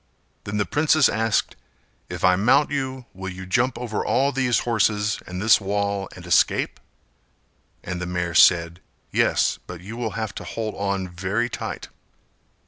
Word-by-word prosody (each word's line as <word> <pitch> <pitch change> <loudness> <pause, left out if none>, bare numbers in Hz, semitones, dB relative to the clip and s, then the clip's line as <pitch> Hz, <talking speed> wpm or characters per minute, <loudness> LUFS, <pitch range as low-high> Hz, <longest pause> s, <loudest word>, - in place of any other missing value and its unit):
Then 100 +1 -3
the 105 - +1
princess 155 -1 +3
asked 110 0 0 0.5
"If - - -6
I 90 0 +5
mount 125 +11 +3
you, 130 -3 -3
will 95 0 -6
you 95 0 -8
jump 120 +7 +1
over 120 -3 -3
all 140 +2 +2
these 130 -3 +1
horses 105 -3 +1
and 90 0 -5
this 110 +2 +5
wall 100 0 -2
and 90 - -11
escape?" 90 - +2 1.0
And 90 0 -5
the 90 - -3
mare 90 -1 -2
said 85 0 +5 0.3
"Yes, - - +2
but 90 -1 -8
you 100 +5 -8
will 115 -4 -3
have 110 -2 -3
to - - -7
hold 110 -2 -4
on 100 -1 -2
very 95 +7 -2
tight." - - -5
105 Hz, 160 wpm, -23 LUFS, 90-120 Hz, 1.0 s, I